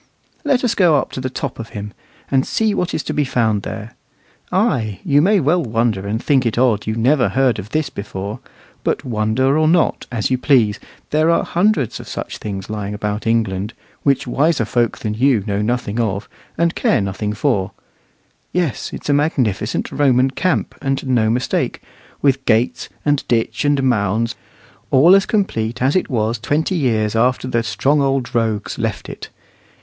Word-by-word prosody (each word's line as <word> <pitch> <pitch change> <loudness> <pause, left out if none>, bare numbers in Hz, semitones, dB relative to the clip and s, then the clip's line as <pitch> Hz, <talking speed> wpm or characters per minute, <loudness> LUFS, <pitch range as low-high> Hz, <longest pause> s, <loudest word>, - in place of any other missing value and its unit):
Let 275 -4 +1
us 240 -2 +2
go 175 -7 +4
up - - -2
to 130 - -5
the 130 - -2
top 130 - -5
of 115 - -6
him, 105 +1 -6 0.4
and 135 -1 +3
see 220 +6 0
what 180 -3 -1
is 155 - -2
to - - -3
be 150 - +1
found 115 -6 +1
there. 110 +3 -7 0.6
Ay, 135 - 0
you 145 +1 +4
may 200 +5 +4
well 165 +4 +2
wonder 115 -5 -1
and 110 +2 -1
think 135 -3 +3
it 115 -2 -1
odd 120 -5 +2
you 110 - -1
never 125 +4 +3
heard 130 -4 +2
of 100 +1 -7
this 155 +2 -1
before; 100 +2 -6 0.4
but - - -1
wonder 120 +4 +1
or 155 - +3
not, 170 +1 +2
as 115 0 -1
you 130 - +1
please, 115 -8 +3 0.3
there 155 +2 +3
are 170 - +3
hundreds 175 - +1
of - - -10
such - - -6
things 100 -2 -5
lying 105 -1 -4
about 105 +1 -3
England, 105 -2 0 0.3
which 140 -1 +1
wiser 140 0 +1
folk 120 0 0
than 105 - -3
you 120 -2 +2
know 100 -1 -1
nothing 120 0 -1
of, 105 -3 -1 0.3
and 170 0 +2
care - - +2
nothing 100 +1 -2
for. 105 -7 0 0.8
Yes, 170 - -1
it's - - -7
a 145 - +3
magnificent 125 -8 0
Roman 130 -2 +3
camp, 185 +6 0
and 135 -1 -1
no 120 -4 +2
mistake, 125 +3 -1 0.4
with 135 -1 +2
gates 125 +3 +1 0.2
and 145 -1 +2
ditch 115 -2 0
and 145 -2 +2
mounds, 115 -1 +1 0.6
all 155 +8 +6
as 195 0 +4
complete 120 - -1
as 130 +3 +2
it 185 - +1
was 115 -2 0
twenty 150 - 0
years 115 - +1
after 125 +3 +1
the 120 -2 +1
strong 115 +7 +1
old 135 -2 0
rogues 110 -3 -1
left - - -3
it. - - -8
125 Hz, 180 wpm, -19 LUFS, 110-145 Hz, 0.8 s, all